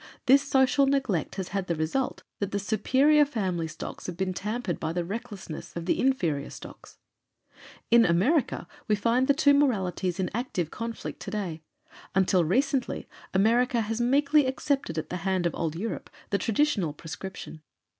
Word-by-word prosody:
This 275 +2 +6
social 275 0 +3
neglect 260 - 0
has 190 -2 -4
had 195 -2 -2
the 170 - 0
result 160 +12 -2 0.2
that 200 - -1
the 200 - 0
superior 260 +9 +3
family 190 - -2
stocks 155 - -7
have 175 -2 -5
been 190 0 -1
tampered 210 0 -3
by 160 +1 -2
the 175 0 -1
recklessness 205 -5 -7
of 170 -1 -4
the - - +1
inferior 170 - +1
stocks. - - -12 0.9
In 235 0 +7
America, 220 - +2 0.2
we 210 - +3
find 235 +5 +2
the 280 - +4
two 285 -1 +5
moralities 190 -9 +1
in 185 -2 -1
active 200 - -2
conflict 230 0 -5
today. 195 -6 -4 0.5
Until 185 -2 +3
recently 260 - 0 0.3
America 235 +4 +3
has 225 +2 -2
meekly 280 +3 +4
accepted 265 - -1
at 160 - -4
the 180 - -2
hand 190 -1 0
of 170 - +1
Old 160 -2 -2
Europe 220 +7 -4 0.2
the 200 - +2
traditional 215 - +1
prescription. 165 +1 -8
210 Hz, 160 wpm, -27 LUFS, 180-260 Hz, 0.9 s, In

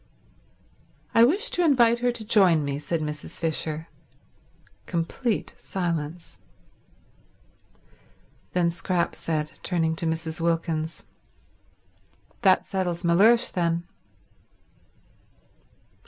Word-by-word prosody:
"I 230 - +6
wish 395 - +2
to 355 - +1
invite 240 -7 +4
her 245 0 +1
to 230 -2 -7
join 185 -8 +4
me," 140 0 -2
said 165 +2 -2
Mrs. 150 -1 -5
Fisher. 160 -1 -2 1.0
Complete 185 +7 -2
silence. 170 -3 -4 2.1
Then 175 -1 +2
Scrap 175 0 -1
said, 155 -2 -3
turning 165 -3 0
to 165 - -1
Mrs. 160 0 -3
Wilkins, 165 -1 -1 1.4
"That 190 -4 +4
settles 180 -2 -2
Mellersh, 215 +8 +4
then." 170 -1 0
170 Hz, 90 wpm, -25 LUFS, 160-210 Hz, 2.1 s, I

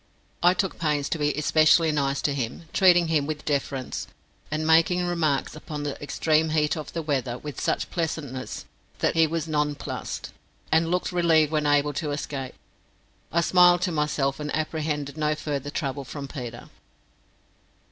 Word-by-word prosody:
I 175 +1 +5
took 190 0 -2
pains 150 -3 0
to 165 - -2
be 145 0 +2
especially 155 +2 +4
nice 140 -2 0
to 145 - +1
him, 125 +1 -4
treating 175 -3 +5
him 150 -3 +1
with 155 -1 -5
deference, 135 -3 -2 0.4
and 155 +1 -2
making 165 +3 +4
remarks 160 -6 0
upon 150 -1 -6
the 145 -2 -4
extreme 155 +2 +1
heat 150 -1 +1
of 155 -3 -7
the 165 - -3
weather 135 -5 -1
with 150 0 -7
such - - -1
pleasantness 155 -7 -4 0.3
that - - +1
he 165 -1 +4
was 165 0 -2
nonplussed, 150 -2 -3 0.4
and 165 +1 +3
looked 180 +1 0
relieved 165 -4 +3
when 150 -1 +1
able 145 0 +3
to 150 +1 -3
escape. 140 -2 -4 0.8
I 170 - +2
smiled 175 +1 +5
to 180 - 0
myself, 150 -3 0
and 150 -1 -4
apprehended 150 -2 -2
no 150 0 +1
further 145 -2 -4
trouble 140 -2 -3
from 140 +2 -7
Peter. 120 -4 -8
150 Hz, 160 wpm, -25 LUFS, 145-160 Hz, 0.8 s, I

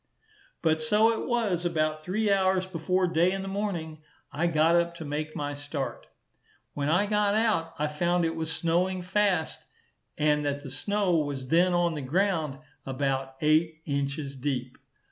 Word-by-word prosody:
But 160 -1 +2
so 210 +8 +4
it - - -4
was, 215 -8 0
about 155 -2 0
three 205 +5 0
hours 190 -1 +2
before 185 +1 0
day 175 +1 +2
in 195 0 -3
the - - -6
morning 180 -6 -3 0.3
I 155 +4 0
got 165 0 +3
up 170 0 +1
to 165 -2 -7
make 150 +1 -4
my 145 0 -3
start. 145 -1 -5 0.7
When 145 0 -1
I 180 +6 +3
got 210 0 +2
out, 215 -8 +1
I 150 - 0
found 175 +3 +1
it 165 0 -1
was 160 0 -3
snowing 180 +3 0
fast, 185 -3 +1 0.6
and 150 -1 +2
that 145 0 -2
the 135 - -8
snow 195 +4 0
was 140 -4 -3
then 175 +3 +4
on 175 -1 +2
the 150 - -4
ground 160 -1 0 0.3
about 135 0 -2
eight 155 +1 +2
inches 140 0 -2
deep. 130 -2 -3
165 Hz, 165 wpm, -28 LUFS, 150-185 Hz, 0.7 s, so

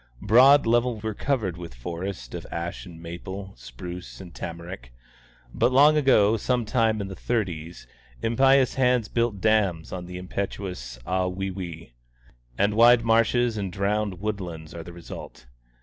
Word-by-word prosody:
Both - - -10
broad 135 +5 +7
levels 120 -1 +1
were 110 0 -2
covered 105 -8 -1
with 85 -7 -9
forest 85 0 -6
of - - -6
ash 85 +3 -5
and 85 -2 -11
maple, 95 +4 -7
spruce 85 +10 -9
and 90 -3 -11
tamarack; 85 -7 -7 0.6
but 125 - +2
long 145 +4 +6
ago, 115 -7 +4
some 120 +2 0
time 110 -1 +1
in 100 - -4
the 95 - -7
thirties, 85 -7 -3 0.3
impious 135 - +3
hands 125 -4 +2
built 115 -4 0
dams 100 -6 +1
on 90 -1 -6
the 90 0 -7
impetuous 90 -8 -5
Ahwewee, 90 -3 -3 0.7
and 100 +1 +2
wide 115 +1 +6
marshes 115 +1 +3
and 100 -3 -3
drowned 100 -1 -1
wood 105 0 -2
lands 80 -3 -8
are 85 - -6
the 85 - -10
result. 85 -7 -10
100 Hz, 150 wpm, -25 LUFS, 85-115 Hz, 0.7 s, broad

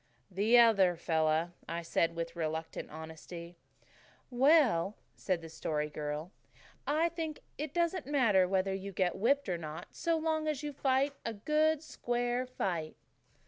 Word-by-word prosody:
"The 210 +6 +4
other 200 -7 +6
fellow," 160 0 +1 0.2
I 170 0 -3
said 165 0 +1
with 165 0 -4
reluctant 160 -1 -3
honesty. 160 +2 -9 0.8
"Well," 245 - +4 0.2
said 185 -3 -1
the - - -7
Story 150 -1 -2
Girl, 150 +3 -4 0.6
"I 315 +4 +2
think 325 -3 -5 0.2
it 300 -1 -3
doesn't 340 -2 0
matter 225 -10 +4
whether 190 +1 +1
you 195 +1 -5
get 180 -1 +1
whipped 275 +6 +2
or 175 -2 -1
not 155 -1 -7
so 335 -1 0
long 315 -1 0
as 300 -2 -1
you 295 -1 -4
fight 270 +1 +1
a 230 - -3
good, 305 +7 +2
square 245 -2 -1
fight." 175 -10 -3
200 Hz, 145 wpm, -32 LUFS, -, 0.8 s, other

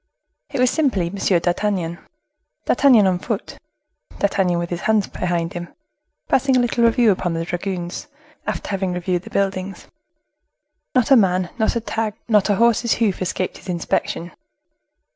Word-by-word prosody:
It 275 - -4
was 255 0 +4
simply 205 - 0
M. - - -7 0.2
d'Artagnan; 175 -1 -1 0.7
D'Artagnan 250 -8 +5
on 185 -2 +2
foot; 220 +1 -5 0.6
D'Artagnan 190 -3 +1
with 170 0 -3
his 175 +1 -3
hands 215 -2 +2
behind 175 -2 -2
him, 175 0 -6 0.6
passing 265 0 +3
a - - +4
little 240 -1 +2
review 230 -1 +4
upon 180 -3 -1
the 165 0 -2
dragoons, 175 0 -4 0.4
after - - -3
having 190 -2 -1
reviewed 180 0 -1
the - - -11
buildings. 195 -1 -2 1.1
Not 255 +1 +2
a - - +9
man, 185 -5 +2
not 220 - +1
a 235 - 0
tag, 220 -1 -2
not 210 -3 +3
a 205 - +3
horse's 235 +1 +3
hoof 210 -6 0
escaped 185 0 -2
his - - -12
inspection. 170 0 -2
195 Hz, 155 wpm, -21 LUFS, 175-225 Hz, 1.1 s, a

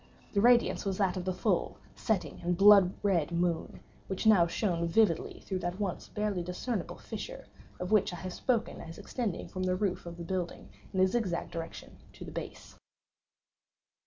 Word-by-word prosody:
The 200 - +3
radiance 240 +1 +4
was 195 -2 -1
that 195 -3 +1
of 180 -1 -4
the 185 - +1
full, 180 - 0 0.2
setting, 220 -5 -1
and 175 0 0
blood 200 -2 +8
red 175 -6 +2
moon, 170 -1 -1 0.3
which 190 +3 -3
now 200 -6 +6
shone 170 -2 0
vividly 170 -1 +2
through 190 -2 -3
that 175 +2 -3
once 195 -4 -3
barely 210 -3 -1
discernible 180 +3 -3
fissure, - - -7 0.3
of 180 +2 -4
which 210 -3 +4
I - - -5
have 180 +2 -6
before - - -7
spoken 245 -4 -1
as 165 0 -9
extending 205 -2 -3
from 185 - -6
the 185 0 +1
roof 185 -2 -1
of 170 0 -7
the 170 - -6
building, 180 -1 -4 0.2
in 190 - +1
a - - +7
zigzag 190 -4 -1
direction, 165 -1 -7 0.2
to - - -9
the - - -8
base. - - -8
185 Hz, 185 wpm, -31 LUFS, 175-210 Hz, 0.3 s, blood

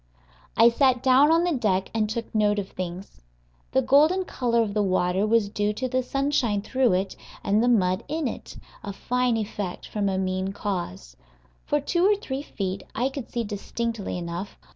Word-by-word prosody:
I 230 +1 +8
sat 255 0 +2
down 270 +3 +5
on 330 +1 +4
the 355 - +1
deck 195 -7 0
and 215 -2 0
took 230 +1 -4
note 210 -1 +2
of 200 -1 -3
things. 180 - -7 0.5
The 265 - +2
golden 305 +9 +4
color 235 -6 +1
of 205 -2 -4
the 210 - +1
water 185 +1 +1
was 225 -1 +3
due 205 0 -1
to 255 +5 -3
the 255 +1 0
sunshine 255 -6 0
through 255 -2 +2
it 190 +1 -1 0.3
and 205 +2 +2
the 240 - +2
mud 185 -6 +2
in 310 -1 -1
it - - -7 0.3
a 200 - -5
fine 250 +2 0
effect 205 -4 -4
from 205 -2 -1
a 190 - -1
mean 190 0 -1
cause. 175 - -4 0.5
For 295 - +1
two 345 +5 0
or 410 +2 +5
three 275 -9 -5
feet 195 -9 -4
I 250 +4 +1
could 275 -2 -7
see 235 - -2
distinctly 220 0 -4
enough. 175 +3 -5
220 Hz, 185 wpm, -25 LUFS, 195-260 Hz, 0.5 s, I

